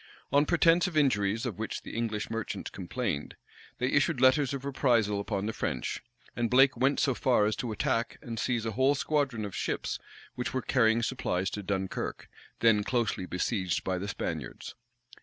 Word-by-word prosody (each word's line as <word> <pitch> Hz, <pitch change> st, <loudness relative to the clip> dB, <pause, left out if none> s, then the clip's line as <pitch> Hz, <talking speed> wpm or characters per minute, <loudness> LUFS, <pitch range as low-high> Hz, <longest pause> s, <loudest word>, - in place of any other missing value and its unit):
On 145 Hz, +2 st, +4 dB
pretence 170 Hz, +1 st, +4 dB
of 170 Hz, -4 st, -3 dB
injuries 115 Hz, -6 st, +2 dB
of 110 Hz, -5 st, -4 dB
which 110 Hz, -, -4 dB
the -, -, -8 dB
English 110 Hz, -2 st, -2 dB
merchants 115 Hz, -1 st, -4 dB
complained, 70 Hz, -, -3 dB, 0.4 s
they 125 Hz, -, -1 dB
issued 145 Hz, 0 st, +2 dB
letters 130 Hz, +1 st, +4 dB
of 140 Hz, -1 st, -4 dB
reprisal 120 Hz, -7 st, +2 dB
upon 100 Hz, -1 st, -2 dB
the 110 Hz, -, -2 dB
French; 65 Hz, -, -3 dB, 0.3 s
and 120 Hz, -1 st, 0 dB
Blake 135 Hz, +1 st, +5 dB
went 130 Hz, +4 st, +2 dB
so 135 Hz, -, +2 dB
far 120 Hz, -3 st, +2 dB
as 105 Hz, 0 st, +1 dB
to 120 Hz, -, -3 dB
attack 115 Hz, +2 st, -1 dB
and 115 Hz, -2 st, -6 dB
seize 120 Hz, -2 st, 0 dB
a 110 Hz, -, -1 dB
whole 130 Hz, +6 st, +3 dB
squadron 135 Hz, -7 st, 0 dB
of 100 Hz, -, -6 dB
ships -, -, -2 dB, 0.3 s
which 125 Hz, +1 st, -4 dB
were 130 Hz, -, -1 dB
carrying 115 Hz, -1 st, +3 dB
supplies 95 Hz, -7 st, -1 dB
to 105 Hz, -, -4 dB
Dunkirk, 95 Hz, -1 st, -3 dB, 0.3 s
then 110 Hz, -3 st, +5 dB
closely 115 Hz, -5 st, -1 dB
besieged 90 Hz, 0 st, -1 dB
by 95 Hz, -1 st, -1 dB
the 100 Hz, -, -4 dB
Spaniards. 80 Hz, -9 st, -5 dB
115 Hz, 175 wpm, -29 LUFS, 105-130 Hz, 0.4 s, Blake